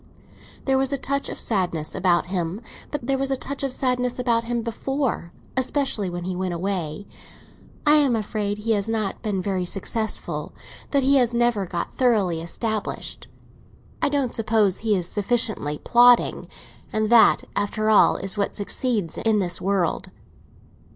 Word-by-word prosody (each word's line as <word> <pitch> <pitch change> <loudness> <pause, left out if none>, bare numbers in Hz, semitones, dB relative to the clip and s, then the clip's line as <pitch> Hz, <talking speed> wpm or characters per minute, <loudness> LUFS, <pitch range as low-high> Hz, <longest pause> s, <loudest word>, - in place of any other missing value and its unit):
There 265 -1 +2
was 270 0 +1
a 280 - 0
touch 280 +1 -2
of - - -7
sadness 175 -7 -1
about 175 -3 +2
him; 180 +2 -3 0.3
but 295 -5 -4
there 270 +1 0
was 270 0 -1
a 270 - 0
touch 280 +2 -5
of 275 -1 -1
sadness 250 -2 0
about 235 -2 +1
him 235 -1 -2
before—especially 255 -1 -2
when 175 0 -5
he 185 +1 -3
went 185 -1 -2
away. 180 -1 -3 0.8
I 300 +1 +6
am 280 -5 +3
afraid 210 -1 -2
he 220 +2 -2
has 205 0 +1
not 215 -3 -2
been 200 -5 -2
very 190 -2 -1
successful—that 220 +7 -3
he 275 +1 +4
has 240 -2 +2
never 235 -5 +1
got 170 0 -4
thoroughly 205 -10 +2
established. 215 +5 -3 0.7
I - - +2
don't 280 -4 -1
suppose 215 -4 +2
he 215 -2 +1
is 180 -3 -1
sufficiently 205 -8 0
plodding, 245 +4 +4 0.4
and 215 +1 0
that, 235 -1 +6
after 215 +2 0
all, 210 - +6
is 195 +2 -1
what 200 - -1
succeeds 205 -3 -2
in 220 -1 +2
this 175 -4 0
world." 190 -3 0
215 Hz, 155 wpm, -23 LUFS, 190-245 Hz, 0.8 s, I